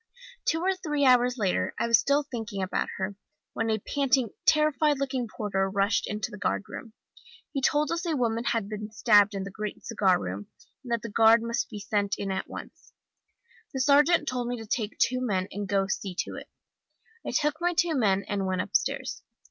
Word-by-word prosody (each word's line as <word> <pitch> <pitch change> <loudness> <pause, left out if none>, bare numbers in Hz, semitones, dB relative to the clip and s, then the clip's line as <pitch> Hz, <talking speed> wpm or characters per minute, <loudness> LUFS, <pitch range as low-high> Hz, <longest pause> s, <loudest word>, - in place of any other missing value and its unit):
"Two 325 - +1
or 380 +2 +2
three 300 -6 -1
hours 250 0 +4
later 195 -5 0
I - - 0
was 230 -2 +5
still 285 +1 +2
thinking 225 -7 -5
about 185 - -1
her, 190 +1 -3 0.4
when 225 0 -1
a 220 - +2
panting, 260 +1 +1 0.2
terrified 305 -1 +3
looking 265 -3 -2
porter 195 -3 -1
rushed 200 +2 +1
into 210 +1 -3
the 210 - -9
guard 205 - 0
room. 220 +1 -9 0.6
He 275 - -2
told 295 +3 +2
us 335 0 -1
a 325 - 0
woman 230 -1 0
had 230 -4 0
been 210 0 -6
stabbed 210 -2 +4
in 195 - -2
the 195 - -7
great 210 +1 -6
cigar 195 -5 +2
room, 95 +2 -5 0.4
and 245 - -8
that 235 -2 0
the 230 - -5
guard 225 +1 +5
must 235 0 -2
be 215 - -7
sent 205 0 -1
in 195 -1 -3
at 190 - -3
once. - - -10 0.8
The - - -1
sergeant 295 +4 +4
told 250 -3 -2
me 245 0 -2
to 225 - -8
take 215 -1 -2
two 255 0 +1
men, 195 -6 0
and 205 +1 -4
go 200 -1 +3
and 195 0 -2
see 190 -4 -3
to - - -7
it. - - -9 0.7
I - - -4
took 300 +1 0
my 350 0 +1
two 340 -1 +2
men 200 -8 +2
and 195 -1 -2
went 185 -1 0
upstairs. - - -1
225 Hz, 205 wpm, -27 LUFS, 200-270 Hz, 0.8 s, was